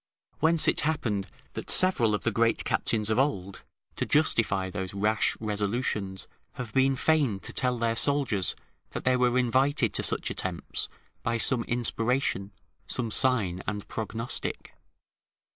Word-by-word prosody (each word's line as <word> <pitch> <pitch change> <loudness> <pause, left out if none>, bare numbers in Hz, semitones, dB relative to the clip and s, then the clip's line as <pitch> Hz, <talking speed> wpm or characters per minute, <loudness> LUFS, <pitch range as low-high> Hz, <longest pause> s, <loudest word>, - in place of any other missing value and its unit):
Whence 160 +1 +3
it - - +3
happened 115 -11 -1 0.3
that - - -7
several 125 - +3
of - - -5
the 115 - +1
great 115 +1 +1
captains 110 -1 0
of 110 - +2
old, 100 -9 -1 0.4
to - - -1
justify 110 -10 +2
those 95 +1 -5
rash 105 +2 +1
resolutions, 105 -2 -2 0.3
have 120 -4 -7
been 135 0 +3
fain 135 -7 +1
to - - -8
tell 125 -1 +2
their 115 -1 0
soldiers 135 -8 +2 0.4
that - - -4
they 130 0 +3
were 125 0 +2
invited 130 -2 +2
to - - 0
such - - 0
attempts 90 -2 -3 0.3
by 115 0 -1
some 120 0 +3
inspiration, 120 -3 0 0.4
some 115 -3 -1
sign 105 -9 +2
and 105 -1 -4
prognostic. 115 +1 -4
115 Hz, 145 wpm, -27 LUFS, 105-130 Hz, 0.4 s, Whence